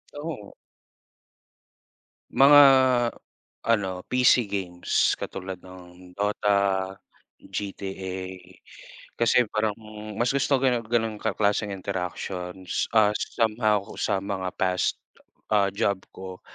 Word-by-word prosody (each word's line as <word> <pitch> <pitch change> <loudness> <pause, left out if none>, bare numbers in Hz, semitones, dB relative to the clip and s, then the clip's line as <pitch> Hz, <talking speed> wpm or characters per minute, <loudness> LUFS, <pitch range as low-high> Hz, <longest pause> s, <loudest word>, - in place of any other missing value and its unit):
Oo. 145 -9 -7 1.8
Mga, 145 +2 +7 1.1
ano 95 -5 0
PC 125 -1 +5
games 90 -3 0
katulad 95 -1 -7
ng 90 0 -14
DOTA, 100 -1 +1 0.5
GTA 95 -2 -5 1.0
Kasi 120 +1 +3
parang, 110 -1 0
hmm, 105 -1 -10
mas 120 +3 +1
gusto 140 0 +2
ganun, 125 -2 +2
ganung 115 -2 0
ka 110 -3 -2
klaseng 105 0 +1
interactions. 95 -1 -4
Ah, 105 -1 +5
somehow 110 -2 0
kung - - -10
sa - - +1
mga 95 -2 -3
past, 90 -1 0 0.6
ah, 100 -2 +4
job 100 0 0 0.2
ko. 95 -1 -8
100 Hz, 100 wpm, -25 LUFS, 95-110 Hz, 1.8 s, Mga